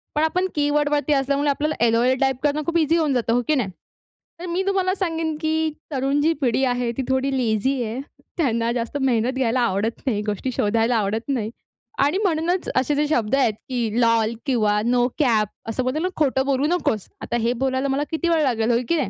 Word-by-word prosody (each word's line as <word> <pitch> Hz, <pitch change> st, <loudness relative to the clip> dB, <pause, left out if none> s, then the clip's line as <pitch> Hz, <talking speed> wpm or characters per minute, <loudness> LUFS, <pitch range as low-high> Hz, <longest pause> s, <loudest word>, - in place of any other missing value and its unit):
पण 305 Hz, -, +2 dB
आपण 365 Hz, +4 st, +1 dB
कीवर्ड 290 Hz, 0 st, +1 dB
वरती 295 Hz, 0 st, +1 dB
असल्यामुळे 280 Hz, +1 st, +1 dB
आपल्याला 300 Hz, +2 st, 0 dB
एल-ओ-एल 240 Hz, +3 st, +3 dB
टाइप 265 Hz, -2 st, +1 dB
करणं 295 Hz, +1 st, +1 dB
खूप 335 Hz, 0 st, 0 dB
ईझी 320 Hz, +2 st, +2 dB
होऊन 310 Hz, -4 st, +1 dB
जातं, 235 Hz, -2 st, +1 dB
हो 245 Hz, -, +2 dB
की 310 Hz, -, +3 dB
नाही. 240 Hz, -8 st, 0 dB, 0.7 s
तर 355 Hz, -, -6 dB
मी 355 Hz, +2 st, -1 dB
तुम्हाला 380 Hz, -1 st, +1 dB
सांगेन 325 Hz, -4 st, -2 dB
की 315 Hz, 0 st, 0 dB, 0.2 s
तरुण 275 Hz, +1 st, 0 dB
जी 320 Hz, +2 st, +3 dB
पिढी 260 Hz, 0 st, +1 dB
आहे 245 Hz, -1 st, 0 dB
ती 270 Hz, -, 0 dB
थोडी 265 Hz, +1 st, +1 dB
लेझी 245 Hz, +2 st, 0 dB
आहे. 230 Hz, +3 st, -4 dB, 0.4 s
त्यांना 235 Hz, -6 st, +1 dB
जास्त 240 Hz, +3 st, -3 dB
मेहनत 245 Hz, -2 st, +2 dB
घ्यायला 250 Hz, -1 st, +1 dB
आवडत 225 Hz, 0 st, 0 dB
नाही. 210 Hz, -4 st, +1 dB
गोष्टी 210 Hz, +5 st, -2 dB
शोधायला 225 Hz, +2 st, +1 dB
आवडत 220 Hz, +5 st, -2 dB
नाही 230 Hz, -5 st, -1 dB, 0.5 s
आणि 290 Hz, +7 st, +2 dB
म्हणूनच 345 Hz, 0 st, 0 dB
असे 265 Hz, +3 st, +2 dB
जे 295 Hz, +1 st, +1 dB
शब्द 240 Hz, -4 st, +1 dB
आहेत 255 Hz, -6 st, +2 dB, 0.2 s
की 245 Hz, -3 st, -1 dB
एल-ओ-एल 230 Hz, 0 st, +2 dB
किंवा 215 Hz, -5 st, +2 dB
नो 245 Hz, 0 st, +3 dB
कॅप 225 Hz, -7 st, +3 dB, 0.2 s
असं 240 Hz, +3 st, -1 dB
बोलतो 255 Hz, +5 st, -1 dB
ना 365 Hz, -, +1 dB
खोटं 265 Hz, -3 st, +1 dB
बोलू 275 Hz, +1 st, +1 dB
नकोस. 305 Hz, -, 0 dB
आता 240 Hz, -, -2 dB
हे 240 Hz, -, +2 dB
बोलायला 265 Hz, +1 st, 0 dB
मला 275 Hz, +2 st, 0 dB
किती 330 Hz, +2 st, -1 dB
वेळ 330 Hz, -2 st, +3 dB
लागेल, 235 Hz, -3 st, +1 dB
हो 235 Hz, -, +3 dB
की 335 Hz, -, +3 dB
नाही. 285 Hz, -, -1 dB
265 Hz, 205 wpm, -22 LUFS, 235-300 Hz, 0.7 s, एल-ओ-एल